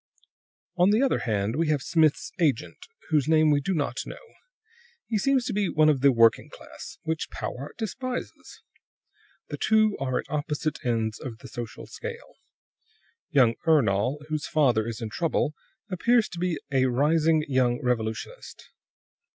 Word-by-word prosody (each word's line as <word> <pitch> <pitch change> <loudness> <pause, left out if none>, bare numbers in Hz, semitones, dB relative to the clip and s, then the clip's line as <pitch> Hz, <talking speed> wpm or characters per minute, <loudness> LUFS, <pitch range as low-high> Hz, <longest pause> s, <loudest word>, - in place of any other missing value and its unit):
"On 180 +2 +5
the 215 +5 +3
other 270 - +2
hand, 110 0 -1
we 165 +1 +1
have 150 -4 0
Smith's 160 -3 +2
agent, 120 - -1 0.2
whose 150 -2 +2
name 155 -1 +4
we 145 -1 +3
do 190 - -2
not 140 -5 -2
know; 485 - -11 0.7
he 220 -3 -1
seems 265 +2 +2
to 250 - -2
be 200 -2 0
one 155 0 +4
of 140 -4 +2
the 140 0 +6
working 115 -2 +4
class, - - -11
which 160 0 -3
Powart 135 +4 -6
despises. 250 +3 -6 0.9
The - - -5
two 215 -1 +3
are 130 -2 -1
at - - -3
opposite 150 0 -3
ends 115 -2 -1
of 115 -4 -7
the 135 - -12
social 120 -4 -7
scale. 475 +1 -8 1.0
Young 130 -7 +4
Ernol, 135 -1 +2
whose 155 -1 -2
father 125 -8 +2
is 115 0 -5
in 110 - -5
trouble, 160 0 0 0.4
appears 230 +5 +3
to 175 - -8
be 180 -2 0
a 130 -1 +3
rising 155 +4 +2
young 125 -3 +1
revolutionist. 110 -3 -4
150 Hz, 155 wpm, -26 LUFS, 125-175 Hz, 1.0 s, the